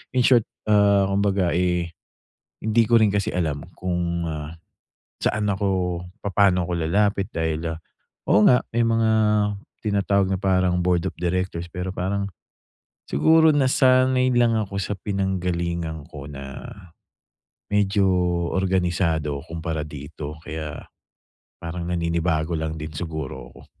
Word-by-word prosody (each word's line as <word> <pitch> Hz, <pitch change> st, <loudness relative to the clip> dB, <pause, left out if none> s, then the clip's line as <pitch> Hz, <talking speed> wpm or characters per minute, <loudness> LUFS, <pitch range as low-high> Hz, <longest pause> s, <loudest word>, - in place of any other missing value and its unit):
in 125 Hz, -, +4 dB
short, 120 Hz, -3 st, +4 dB, 0.2 s
ah, 100 Hz, -1 st, +5 dB
kumbaga 100 Hz, -2 st, +1 dB
eh 90 Hz, 0 st, 0 dB, 0.7 s
hindi 110 Hz, +1 st, +2 dB
ko 115 Hz, +1 st, +4 dB
rin 110 Hz, -, +5 dB
kasi 100 Hz, -1 st, 0 dB
alam 80 Hz, -5 st, -2 dB
kung, 85 Hz, -2 st, -2 dB
ah, 75 Hz, -1 st, -5 dB, 0.7 s
saan 105 Hz, -1 st, 0 dB
ako, 95 Hz, -3 st, -1 dB, 0.2 s
papaano 95 Hz, -2 st, +3 dB
ako -, -, -2 dB
lalapit 100 Hz, +4 st, +1 dB
dahil, 80 Hz, 0 st, -1 dB
ah, -, -, -11 dB, 0.5 s
oo 105 Hz, +1 st, +6 dB
nga 125 Hz, -, +5 dB
may 115 Hz, 0 st, +2 dB
mga 115 Hz, -1 st, +2 dB, 0.7 s
tinatawag 100 Hz, -2 st, +1 dB
na 95 Hz, -, +1 dB
parang 90 Hz, -2 st, +2 dB
board 90 Hz, -1 st, +1 dB
of -, -, -17 dB
directors 90 Hz, 0 st, -1 dB
pero 90 Hz, +1 st, -5 dB
parang 100 Hz, +2 st, -2 dB, 0.8 s
siguro 160 Hz, 0 st, +5 dB
nasanay 130 Hz, -2 st, +3 dB
lang 120 Hz, -1 st, +4 dB
ako 100 Hz, -2 st, -5 dB
sa 100 Hz, +1 st, -2 dB
pinanggalingan 85 Hz, -5 st, -2 dB
ko 70 Hz, -1 st, -9 dB
na 70 Hz, -1 st, -8 dB, 1.0 s
medyo 100 Hz, -1 st, +2 dB, 0.4 s
organisado 85 Hz, -6 st, 0 dB
kumpara 80 Hz, -2 st, -4 dB
dito 75 Hz, +1 st, -8 dB
kaya, 80 Hz, -2 st, -6 dB, 0.8 s
parang 85 Hz, +1 st, -5 dB
naninibago 85 Hz, -1 st, 0 dB
lang 80 Hz, 0 st, -3 dB
din 75 Hz, 0 st, -6 dB
siguro 75 Hz, -5 st, -5 dB
ko. -, -, -16 dB
90 Hz, 125 wpm, -23 LUFS, 80-100 Hz, 1.0 s, oo